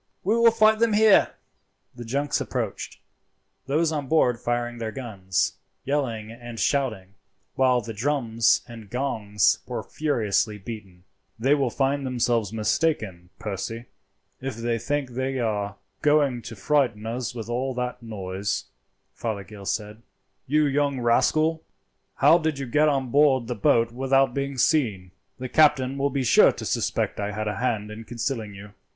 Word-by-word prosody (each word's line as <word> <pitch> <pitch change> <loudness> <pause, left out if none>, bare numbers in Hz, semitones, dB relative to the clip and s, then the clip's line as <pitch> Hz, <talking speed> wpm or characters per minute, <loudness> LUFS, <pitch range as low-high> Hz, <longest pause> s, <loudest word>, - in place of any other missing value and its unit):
We 210 +5 +2
will 235 0 +6
fight 220 -1 +4
them 230 -1 +3
here." 215 -1 +5 0.6
The 120 - -9
junks 140 +5 -1
approached, - - -4 0.7
those 155 +4 +1
on 145 -3 -3
board 125 -6 +2
firing 120 0 -2
their 110 -1 -3
guns, 100 -8 -2 0.3
yelling 120 -6 -2
and 120 0 -9
shouting, 110 -7 -1 0.4
while 130 -2 +3
the 115 0 -7
drums 115 -1 +1
and 115 -3 -11
gongs 110 -6 +1
were - - -4
furiously 110 -7 0
beaten. 95 -4 -9 0.3
"They 130 +5 +3
will 140 -4 +1
find 140 +3 0
themselves 120 -5 0
mistaken, 110 - -1
Percy, 115 +2 -5 0.6
if 135 -3 -4
they 115 0 -1
think 140 +2 -2
they 130 +2 -2
are 105 -4 -2 0.3
going 145 -5 +3
to 115 - -7
frighten 120 -3 +1
us 120 +2 -4
with 115 -2 -6
all 125 +2 -2
that 125 0 -3
noise," 100 -2 -3 0.5
Fothergill 100 -2 -6
said. 105 +1 -3 0.5
"You 150 +3 +3
young 140 -1 +1
rascal, 155 +7 +2 0.5
how 155 +5 +5
did 155 -3 -1
you 135 - -4
get 150 +5 +3
on 135 -4 -1
board 140 -3 +4
the 125 - -3
boat 115 +2 +2
without 135 +1 +2
being 140 0 -3
seen? 110 - +1 0.3
The 130 0 -5
captain 140 -2 +3
will 140 +1 +2
be 135 -1 -1
sure 115 - +6
to - - -8
suspect - - -1
I 105 0 -2
had 110 +1 -3
a 105 - -2
hand 110 -3 -1
in 110 +1 -8
concealing 115 -2 -4
you." 100 +1 -11
120 Hz, 155 wpm, -25 LUFS, 110-140 Hz, 0.7 s, will